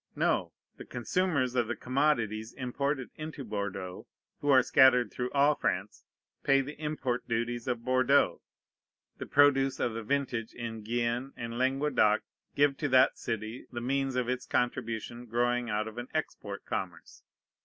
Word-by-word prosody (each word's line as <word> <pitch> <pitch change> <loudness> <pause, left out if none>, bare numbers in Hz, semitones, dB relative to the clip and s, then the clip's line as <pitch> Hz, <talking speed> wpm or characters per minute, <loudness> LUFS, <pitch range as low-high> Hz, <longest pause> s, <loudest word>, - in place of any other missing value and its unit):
No. - - +1 0.3
The - - -9
consumers 130 0 0
of 120 -3 +1
the 120 - -2
commodities 120 -5 0
imported 135 +1 -2
into 155 -2 -6
Bordeaux, 100 -4 -5 0.3
who 145 - -2
are 130 -2 +7
scattered 125 -1 +5
through 125 0 -3
all 145 +1 +4
France, - - -3 0.4
pay 135 0 +4
the 140 +3 -6
import 140 -5 -2
duties 120 +1 -2
of 120 -2 -2
Bordeaux. 130 +2 +3 0.8
The - - -5
produce 135 -2 +4
of 120 - 0
the 115 - -4
vintage 120 -2 -2
in 115 -2 -5
Guienne 120 +4 -1
and 115 -1 -5
Languedoc 130 -5 +2 0.3
give 140 -1 +3
to 145 - -1
that 130 +1 +5
city 115 +1 -4
the 120 - -4
means 135 +2 -1
of 125 -2 0
its 125 0 -2
contribution 120 -1 -2
growing 120 +1 0
out 105 0 -1
of 110 +2 -7
an 120 - -6
export 100 -9 -4
commerce. 85 -4 -5
125 Hz, 155 wpm, -30 LUFS, 115-135 Hz, 0.8 s, are